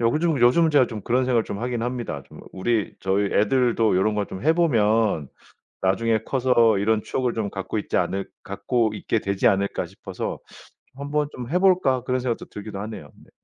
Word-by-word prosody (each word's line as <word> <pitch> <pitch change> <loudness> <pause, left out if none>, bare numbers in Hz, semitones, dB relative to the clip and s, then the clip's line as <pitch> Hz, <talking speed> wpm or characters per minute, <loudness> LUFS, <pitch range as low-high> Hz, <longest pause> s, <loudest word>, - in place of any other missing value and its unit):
요즘 150 +6 +1
요즘 160 +7 +5
제가 140 -4 +4
좀 110 -2 -6
그런 125 +4 +1
생각을 120 -3 +2
좀 100 - -5
하긴 120 0 -2
합니다. 120 - -4
좀 - - -13
우리 105 +2 -1
'저희 95 +1 +1
애들도 115 -2 +2
요런 105 +3 +2
거 105 -1 -1
좀 95 - -8
해보면 115 - +2 0.5
나중에 110 +4 +2
커서 120 -5 +3
이런 105 +2 +1
추억을 125 -2 -2
좀 110 -3 -2
갖고 95 +2 -4
있지 105 - -3
않을 95 +2 -1 0.2
갖고 115 -4 -1
있게 110 - -1
되지 100 +2 +1
않을까?' 100 -1 0
싶어서 - - -6 0.6
'한번 145 +2 -2
좀 125 -1 -7
해 180 - +2
볼까?' 180 -10 +3
그런 130 0 0
생각도 120 -2 -3
들기도 105 -1 -7
하네요. 105 -9 -7
네. - - -21
115 Hz, 355 characters per minute, -23 LUFS, 100-130 Hz, 0.6 s, 요즘